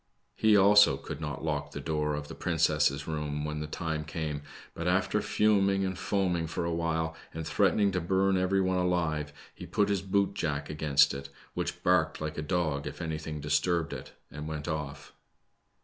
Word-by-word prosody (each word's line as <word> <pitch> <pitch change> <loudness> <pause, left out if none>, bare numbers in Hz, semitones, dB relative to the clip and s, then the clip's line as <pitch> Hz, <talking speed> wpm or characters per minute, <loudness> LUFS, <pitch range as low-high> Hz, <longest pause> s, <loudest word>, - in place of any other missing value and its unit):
He, 110 -1 +5
also, 100 -7 +6
could 75 +2 -7
not 75 -1 -4
lock - - -1
the - - -5
door 75 -1 -1
of 75 0 -5
the - - -8
princess' 75 -4 +1
room 75 -1 -3
when 75 0 -3
the 75 - -4
time 80 0 -3
came, 75 -2 -4 0.3
but - - -4
after - - +2
fuming 100 -2 +2
and 95 0 -2
foaming 90 -4 0
for 85 - -3
awhile, 80 -1 -1 0.2
and 80 0 -4
threatening 100 +4 +3
to 90 -1 -1
burn 95 +3 +2
every 95 +1 +2
one 95 -1 +1
alive, 85 -5 0 0.2
he - - -10
put 105 -1 +1
his 100 -2 +1
boot 100 0 +1
jack 70 -2 -2
against 75 -2 +3
it, 70 0 -6 0.2
which - - -4
barked - - +2
like 75 0 -4
a - - -1
dog 75 -3 -1
if - - -7
anything 80 -1 -4
disturbed 80 +3 +1
it, - - -8 0.2
and 75 +1 -6
went 75 -1 -5
off. 75 -3 -5
80 Hz, 180 wpm, -29 LUFS, 75-95 Hz, 0.3 s, also